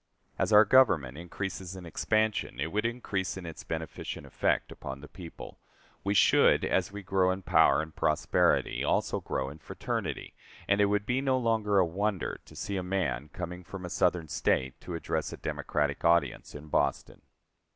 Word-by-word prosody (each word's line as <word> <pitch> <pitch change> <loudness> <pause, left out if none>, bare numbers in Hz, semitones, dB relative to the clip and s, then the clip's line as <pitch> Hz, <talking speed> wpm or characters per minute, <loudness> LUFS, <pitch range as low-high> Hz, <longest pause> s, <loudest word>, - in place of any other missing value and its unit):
As - - +1
our 105 +1 +8
Government 95 - +4
increases 95 +2 -5
in 95 -2 -9
expansion 110 +5 0
it 80 - -2
would 105 +3 +1
increase 100 -6 -3
in 95 - -7
its 80 -2 -8
beneficent 80 -1 -5
effect - - 0
upon 65 0 -7
the 75 - -11
people; 85 -1 -10 0.4
we 100 +1 0
should, - - +5
as 95 0 +1
we 100 0 -7
grow 95 0 +2
in 95 +1 -2
power 80 - +4
and 80 0 -11
prosperity, 75 - +2
also - - +1
grow 65 - -2
in 75 - -12
fraternity, - - -4 0.3
and 100 +1 +3
it - - +6
would 105 0 0
be 125 +3 0
no 135 -1 +2
longer 110 -4 +1
a 95 - +5
wonder 95 +3 -2
to - - -15
see 100 - -3
a - - -1
man 90 -5 -2
coming 90 +2 -6
from 90 +1 -8
a 90 - -6
Southern 90 -2 +1
State 65 -3 0
to 90 - -6
address 85 - -2
a - - -7
Democratic 75 -1 -2
audience 85 -2 +2
in 75 +1 -8
Boston. - - -1
95 Hz, 180 wpm, -29 LUFS, 80-105 Hz, 0.4 s, our